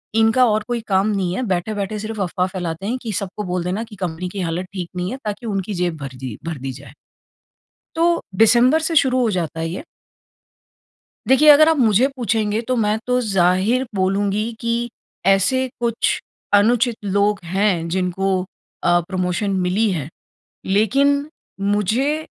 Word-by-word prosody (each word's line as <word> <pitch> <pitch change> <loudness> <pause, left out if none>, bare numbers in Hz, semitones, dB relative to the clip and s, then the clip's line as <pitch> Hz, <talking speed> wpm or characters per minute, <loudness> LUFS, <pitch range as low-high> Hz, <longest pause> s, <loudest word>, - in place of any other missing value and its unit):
इनका 225 +3 +4
और 215 0 +1
कोई 240 -1 -1
काम 195 0 +2
नहीं 190 -4 -1
है, - - -2
बैठे-बैठे 200 +3 -2
सिर्फ़ 215 0 -5
अफ़वाह 180 0 0
फैलाते 180 -1 -5
हैं 245 +4 -1
कि 225 - -4
सबको 200 +1 -4
बोल 180 -2 -2
देना 185 +5 -2
कि 225 -2 -12
कंपनी 180 -1 -4
की 195 - -7
हालत 175 +1 -2
ठीक 180 -3 -5
नहीं 180 +2 -2
है 260 - -4
ताकि 210 +3 -4
उनकी 200 -1 -2
जेब 175 -3 -1
भर 135 -3 -7
दी 125 -5 -6
भर 165 -2 -4
दी 135 +1 -4
जाए। 135 0 -12 1.0
तो 330 - +2 0.3
डिसेंबर 240 +8 +5
से 325 +1 -1
शुरू 255 -3 +3
हो 235 -3 +2
जाता 165 -4 -3
है 165 - -2
ये। 180 - -6 1.4
देखिए 275 +4 +5
अगर 300 +1 +8
आप 325 - +3
मुझे 230 0 +4
पूछेंगे 220 -2 0
तो 255 - +2
मैं 215 -1 +1
तो 250 0 +2
ज़ाहिर 195 +4 +2
बोलूँगी 200 +3 0
कि 235 +1 -1 0.4
ऐसे 195 +7 +3
कुछ 235 -1 0 0.3
अनुचित 230 +3 +3
लोग 200 +1 +1
हैं, 180 -1 0
जिनको 185 +1 0 0.4
अ, 175 0 +3
प्रमोशन 185 +2 -1
मिली 195 +5 +1
है। 155 -7 -3 0.6
लेकिन 275 +9 +2 0.3
मुझे 220 +10 0
205 Hz, 165 wpm, -20 LUFS, 180-235 Hz, 1.4 s, अगर